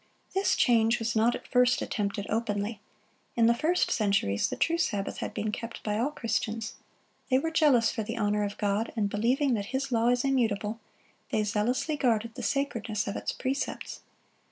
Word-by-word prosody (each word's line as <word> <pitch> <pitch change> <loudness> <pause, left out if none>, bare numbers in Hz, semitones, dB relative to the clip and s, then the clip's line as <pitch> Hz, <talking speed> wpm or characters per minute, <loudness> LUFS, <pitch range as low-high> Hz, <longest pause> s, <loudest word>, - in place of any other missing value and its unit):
This 385 +1 +2
change 235 -3 +4
was 225 0 -2
not 225 +2 +3
at - - -9
first 250 -1 +3
attempted 200 -2 -2
openly. 210 -1 -2 0.5
In 230 - +4
the 235 - +6
first 330 +9 +1
centuries 200 - +1
the - - -3
true 335 0 +1
Sabbath 205 -11 -1
had - - -3
been 215 0 -2
kept 230 +2 -6
by 210 0 -1
all 250 +5 +1
Christians. 225 -4 -2 0.6
They 260 - +4
were 320 +4 -1
jealous 280 -8 +4
for - - -3
the 225 +3 -4
honor 210 -1 +1
of 205 0 -4
God, 205 +2 0
and 205 -3 0
believing 250 +6 +2
that 205 -3 -1
His 265 +2 -2
law 230 -1 +2
is 245 0 +2
immutable, 225 -5 0 0.5
they 215 - +1
zealously 230 +8 0
guarded 230 -4 +1
the - - -7
sacredness 230 -7 -1
of 200 - -3
its - - -2
precepts. 270 +2 -3
230 Hz, 180 wpm, -28 LUFS, 210-255 Hz, 0.6 s, the